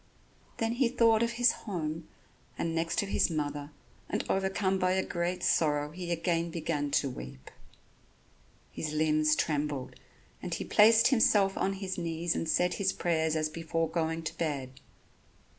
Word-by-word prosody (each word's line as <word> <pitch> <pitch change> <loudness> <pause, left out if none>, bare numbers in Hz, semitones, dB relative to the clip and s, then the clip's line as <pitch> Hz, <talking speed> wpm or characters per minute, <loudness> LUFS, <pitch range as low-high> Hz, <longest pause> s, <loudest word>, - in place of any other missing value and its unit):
Then 225 0 0
he 240 0 +1
thought 230 -2 +3
of 235 0 0
his 245 +1 +4
home 165 -5 -5 0.5
and 165 - -2
next 165 +5 0
of 200 - -6
his - - +2
mother, 145 -2 -3 0.4
and - - -1
overcome 190 0 0
by 185 0 +2
a 190 0 0
great 180 +1 -2
sorrow 150 -2 +1
he 175 +1 -7
again 170 0 0
began 160 -3 -2 0.2
to - - -1
weep. 65 - -10 1.2
His 155 -1 -4
limbs 155 0 +3
trembled; 145 -4 -2 0.5
and - - -3
he - - -4
placed 225 +3 +5
himself 210 -6 +3
on 195 - 0
his 190 -1 -4
knees 165 0 -2
and 165 - -2
said 180 +2 +2
his 195 -1 0
prayers 160 -2 0
as 155 -1 +1
before 165 +1 -2
going 165 0 -2
to 160 - -4
bed. 140 -5 -2
165 Hz, 160 wpm, -30 LUFS, 155-190 Hz, 1.2 s, placed